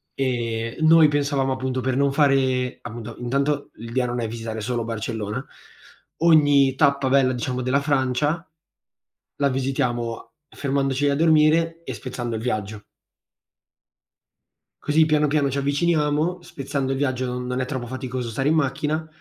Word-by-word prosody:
Ehm, 115 Hz, -3 st, -2 dB
noi 160 Hz, -1 st, +7 dB
pensavamo, 140 Hz, -2 st, 0 dB
appunto, 130 Hz, 0 st, -2 dB
per 130 Hz, 0 st, -1 dB
non 140 Hz, 0 st, +2 dB
fare, 130 Hz, -3 st, +2 dB
appunto 115 Hz, 0 st, -8 dB
intanto, 140 Hz, +4 st, -1 dB
l'idea 115 Hz, +3 st, -2 dB
non 120 Hz, 0 st, -3 dB
è 115 Hz, -, -1 dB
visitare 115 Hz, -1 st, -5 dB
solo 120 Hz, +1 st, -2 dB
Barcellona. 110 Hz, -2 st, -4 dB, 0.7 s
Ogni 145 Hz, -5 st, +5 dB
tappa 140 Hz, -2 st, +2 dB
bella, 130 Hz, -1 st, +3 dB
diciamo, 125 Hz, +1 st, -3 dB
della 130 Hz, +3 st, +1 dB
Francia, 145 Hz, +4 st, 0 dB, 0.9 s
la 140 Hz, -1 st, +2 dB
visitiamo, 125 Hz, -3 st, -2 dB
fermandoci 140 Hz, 0 st, 0 dB
a 140 Hz, -, +1 dB
dormire 165 Hz, +1 st, +3 dB
e -, -, -5 dB
spezzando 120 Hz, -3 st, -5 dB
il 110 Hz, -, -5 dB
viaggio. 105 Hz, -3 st, -3 dB, 2.0 s
Così, 155 Hz, +2 st, +3 dB
piano 150 Hz, -1 st, +2 dB
piano, 145 Hz, -1 st, +1 dB
ci 140 Hz, -, -3 dB
avviciniamo. 150 Hz, +3 st, +1 dB
Spezzando 135 Hz, -4 st, -4 dB
il 135 Hz, -, -1 dB
viaggio 130 Hz, -2 st, -1 dB
non 125 Hz, +1 st, -3 dB
è 130 Hz, -, 0 dB
troppo 125 Hz, -3 st, -4 dB
faticoso 130 Hz, -1 st, -4 dB
stare 135 Hz, +6 st, 0 dB
in 160 Hz, -, +3 dB
macchina. 155 Hz, +2 st, -1 dB
135 Hz, 140 wpm, -23 LUFS, 125-145 Hz, 2.0 s, noi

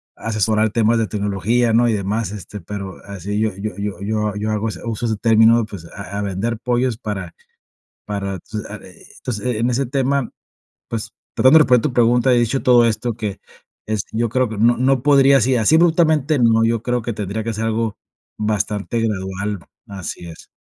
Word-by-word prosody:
asesorar 110 Hz, 0 st, 0 dB
temas 115 Hz, +1 st, +2 dB
de 110 Hz, -, 0 dB
tecnología, 105 Hz, +4 st, 0 dB
¿no? 120 Hz, +1 st, +4 dB
Y -, -, +1 dB
demás, 105 Hz, +1 st, -1 dB
este, 105 Hz, 0 st, -8 dB
pero 100 Hz, +1 st, -7 dB
así 100 Hz, +1 st, -4 dB
yo 110 Hz, 0 st, +2 dB
yo 105 Hz, +1 st, -4 dB, 0.3 s
yo 105 Hz, 0 st, -1 dB
yo 105 Hz, +1 st, -2 dB
hago 110 Hz, +1 st, -1 dB
ese -, -, -8 dB
uso 115 Hz, 0 st, -3 dB
ese 110 Hz, -1 st, -1 dB
término, 115 Hz, +1 st, +4 dB
pues, 100 Hz, -6 st, -10 dB
a 100 Hz, +4 st, -7 dB
a -, -, -1 dB
vender 100 Hz, +4 st, -2 dB
pollos 125 Hz, -1 st, 0 dB
para 95 Hz, -6 st, -5 dB, 0.7 s
para, 100 Hz, -2 st, -4 dB
pues, 105 Hz, -1 st, -4 dB
ah, 105 Hz, +1 st, -7 dB
eh, 90 Hz, -, -16 dB
entonces 115 Hz, -5 st, -5 dB
eh, 125 Hz, -3 st, -1 dB
en 120 Hz, +2 st, +1 dB
ese 135 Hz, +3 st, 0 dB
tema, 135 Hz, 0 st, 0 dB, 0.6 s
pues, 115 Hz, -2 st, -5 dB, 0.2 s
tratando 130 Hz, +5 st, +6 dB
de -, -, +7 dB
responder 125 Hz, -1 st, +4 dB
tu 135 Hz, -, -2 dB
pregunta, 120 Hz, +2 st, +3 dB
he 120 Hz, -, +4 dB
dicho 120 Hz, +3 st, 0 dB
todo 120 Hz, -2 st, +5 dB
esto 115 Hz, +1 st, -1 dB
que 105 Hz, -4 st, -4 dB, 0.5 s
es, 110 Hz, -2 st, -1 dB
yo 115 Hz, +1 st, 0 dB
creo 130 Hz, +1 st, +1 dB
que 110 Hz, -, -6 dB
no 120 Hz, +2 st, +4 dB
no 130 Hz, +1 st, +2 dB
podría 140 Hz, -1 st, +6 dB
así 130 Hz, +1 st, +2 dB
así 115 Hz, +7 st, +3 dB
abruptamente 160 Hz, -3 st, +3 dB
no, 115 Hz, -1 st, +4 dB
yo 115 Hz, 0 st, 0 dB
creo 125 Hz, 0 st, 0 dB
que 120 Hz, -, -3 dB
tendría 105 Hz, +1 st, -4 dB
que 115 Hz, 0 st, -3 dB
ser 110 Hz, +2 st, -3 dB
algo 115 Hz, -1 st, -1 dB, 0.4 s
bastante 105 Hz, +1 st, -1 dB
gradual, 100 Hz, -1 st, -2 dB, 0.3 s
así 95 Hz, -3 st, -7 dB
es. 80 Hz, -1 st, -12 dB
110 Hz, 195 wpm, -20 LUFS, 105-120 Hz, 0.7 s, de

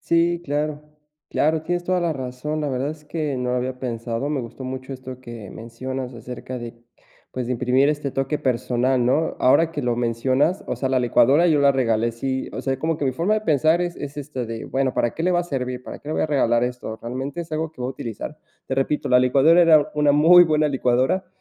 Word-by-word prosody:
Sí, 170 Hz, 0 st, +2 dB
claro 150 Hz, 0 st, -2 dB, 0.5 s
claro, 155 Hz, +1 st, +1 dB
tienes 175 Hz, +1 st, -2 dB
toda 185 Hz, 0 st, +1 dB
la 170 Hz, -2 st, 0 dB
razón, 135 Hz, +4 st, -4 dB
la 145 Hz, -, -1 dB
verdad 130 Hz, +2 st, -1 dB
es 155 Hz, -1 st, -11 dB
que 150 Hz, -2 st, -3 dB
no 125 Hz, 0 st, -2 dB
lo 125 Hz, -, 0 dB
había 125 Hz, +1 st, -3 dB
pensado, 120 Hz, +1 st, -3 dB
me 145 Hz, -3 st, -1 dB
gustó 120 Hz, +2 st, -8 dB
mucho 130 Hz, +1 st, -6 dB
esto 130 Hz, -1 st, -9 dB
que 115 Hz, -5 st, -9 dB
mencionas 125 Hz, +3 st, -6 dB
acerca 125 Hz, +2 st, -7 dB
de 120 Hz, -1 st, -7 dB, 0.6 s
pues, 130 Hz, -, -3 dB
de 125 Hz, -, -1 dB
imprimir 125 Hz, +3 st, +2 dB
este 145 Hz, -2 st, -3 dB
toque 135 Hz, +3 st, -1 dB
personal, 125 Hz, 0 st, +1 dB
¿no? 150 Hz, +6 st, +1 dB
Ahora 160 Hz, +6 st, +4 dB
que 150 Hz, -3 st, -4 dB
lo 120 Hz, -1 st, +1 dB
mencionas, 130 Hz, -, +1 dB
o -, -, -2 dB
sea, 135 Hz, -, -1 dB
la 130 Hz, -1 st, +2 dB
licuadora, 135 Hz, +7 st, +4 dB
yo 150 Hz, -4 st, +3 dB
la 140 Hz, -, +6 dB
regalé, 115 Hz, -3 st, +1 dB
sí, 130 Hz, +3 st, -3 dB
o -, -, -4 dB
sea, 135 Hz, -1 st, -1 dB
como 160 Hz, +2 st, -1 dB
que 145 Hz, -, -3 dB
mi 130 Hz, -, +1 dB
forma 175 Hz, +10 st, +1 dB
de 215 Hz, -, -1 dB
pensar 160 Hz, 0 st, +3 dB
es 175 Hz, -1 st, -3 dB
es, 145 Hz, 0 st, -7 dB
este, 135 Hz, -4 st, -5 dB
de 115 Hz, 0 st, -6 dB
bueno, 135 Hz, -1 st, -1 dB
¿para 120 Hz, -, +1 dB
qué 165 Hz, -, -4 dB
le 180 Hz, -, +2 dB
va 175 Hz, -1 st, +2 dB
a -, -, -2 dB
servir? 125 Hz, -5 st, -4 dB
¿Para -, -, -8 dB
qué 145 Hz, -, -12 dB
le 155 Hz, -, -2 dB
voy -, -, +1 dB
a -, -, +1 dB
regalar 120 Hz, -5 st, +2 dB
esto? 125 Hz, -3 st, -5 dB
¿Realmente 130 Hz, +7 st, -4 dB
es 165 Hz, -1 st, -14 dB
algo 160 Hz, +1 st, -2 dB
que 140 Hz, -5 st, -9 dB
va 125 Hz, -, -1 dB
a -, -, -2 dB
utilizar? 125 Hz, +4 st, -7 dB, 0.3 s
Te 130 Hz, -, -2 dB
repito, 135 Hz, +2 st, -1 dB
la 125 Hz, -, +6 dB
licuadora 140 Hz, +7 st, +5 dB
era 160 Hz, -3 st, +5 dB
una 150 Hz, -1 st, +3 dB
muy 170 Hz, +4 st, +7 dB
buena 155 Hz, -2 st, +2 dB
licuadora 130 Hz, +6 st, +1 dB
135 Hz, 235 wpm, -22 LUFS, 125-155 Hz, 0.6 s, muy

